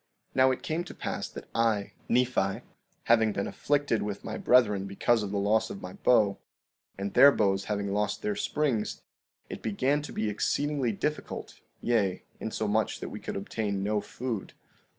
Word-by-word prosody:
16:21 -, -, -37 dB
Now 130 Hz, 0 st, +6 dB
it 130 Hz, -, -2 dB
came 160 Hz, +2 st, -1 dB
to 175 Hz, -, -9 dB
pass -, -, -4 dB
that -, -, -9 dB
I, 115 Hz, -3 st, +1 dB, 0.2 s
Nephi, 120 Hz, -5 st, +2 dB, 0.4 s
having 110 Hz, -2 st, +4 dB
been 100 Hz, -, -1 dB
afflicted 145 Hz, -6 st, 0 dB
with 100 Hz, -1 st, -4 dB
my -, -, -4 dB
brethren 105 Hz, -6 st, +3 dB
because 110 Hz, +4 st, +2 dB
of 105 Hz, -, -3 dB
the 100 Hz, -, -2 dB
loss 105 Hz, +2 st, +2 dB
of 100 Hz, -, -8 dB
my 90 Hz, 0 st, -6 dB
bow, 105 Hz, -5 st, +3 dB, 0.6 s
and 100 Hz, 0 st, -3 dB
their 140 Hz, -, +9 dB
bows 95 Hz, -5 st, +1 dB
having 100 Hz, -2 st, -2 dB
lost 105 Hz, +1 st, -1 dB
their 105 Hz, -, 0 dB
springs, 125 Hz, 0 st, -1 dB, 0.4 s
it -, -, -7 dB
began 130 Hz, +7 st, +1 dB
to 150 Hz, -, -8 dB
be 110 Hz, -, -1 dB
exceedingly 135 Hz, +4 st, 0 dB
difficult, 150 Hz, +9 st, -4 dB, 0.2 s
yea, 100 Hz, -6 st, +1 dB, 0.2 s
insomuch 110 Hz, 0 st, -1 dB
that -, -, -5 dB
we -, -, -7 dB
could -, -, -5 dB
obtain 100 Hz, 0 st, -2 dB
no 105 Hz, +1 st, +1 dB
food. 115 Hz, 0 st, -5 dB
110 Hz, 170 wpm, -29 LUFS, 100-125 Hz, 0.6 s, their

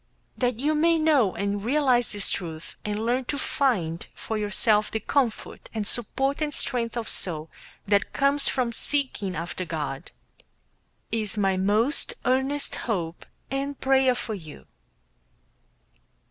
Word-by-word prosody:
That 245 Hz, -3 st, 0 dB
you 295 Hz, +4 st, +1 dB
may 330 Hz, +2 st, +3 dB
know 295 Hz, -, +3 dB
and 200 Hz, 0 st, -2 dB
realize 250 Hz, -2 st, +3 dB
this 205 Hz, -1 st, +3 dB
truth, 165 Hz, -3 st, -5 dB
and 210 Hz, +1 st, -2 dB
learn 250 Hz, +2 st, +1 dB
to 285 Hz, -, -2 dB
find 195 Hz, -, 0 dB
for 220 Hz, -, -4 dB
yourself 210 Hz, 0 st, +2 dB
the 220 Hz, -, -2 dB
comfort 240 Hz, 0 st, -1 dB
and 215 Hz, -2 st, -1 dB
support 270 Hz, +7 st, +1 dB
and 300 Hz, -1 st, 0 dB
strength 245 Hz, -4 st, 0 dB
of 230 Hz, -1 st, -3 dB
soul 160 Hz, -3 st, -1 dB, 0.4 s
that 205 Hz, -1 st, +2 dB
comes 280 Hz, +1 st, +2 dB
from 250 Hz, -3 st, 0 dB
seeking 235 Hz, -8 st, -2 dB
after 170 Hz, +3 st, -4 dB
God, 150 Hz, -5 st, -4 dB, 1.0 s
is 220 Hz, -1 st, -1 dB
my 195 Hz, -2 st, +2 dB
most 210 Hz, +9 st, +2 dB
earnest 265 Hz, +3 st, +1 dB, 0.2 s
hope 170 Hz, -6 st, -2 dB, 0.2 s
and 275 Hz, +1 st, -2 dB
prayer 265 Hz, -1 st, +3 dB
for 225 Hz, -, -4 dB
you. 155 Hz, -, -9 dB
230 Hz, 135 wpm, -26 LUFS, 200-270 Hz, 1.0 s, may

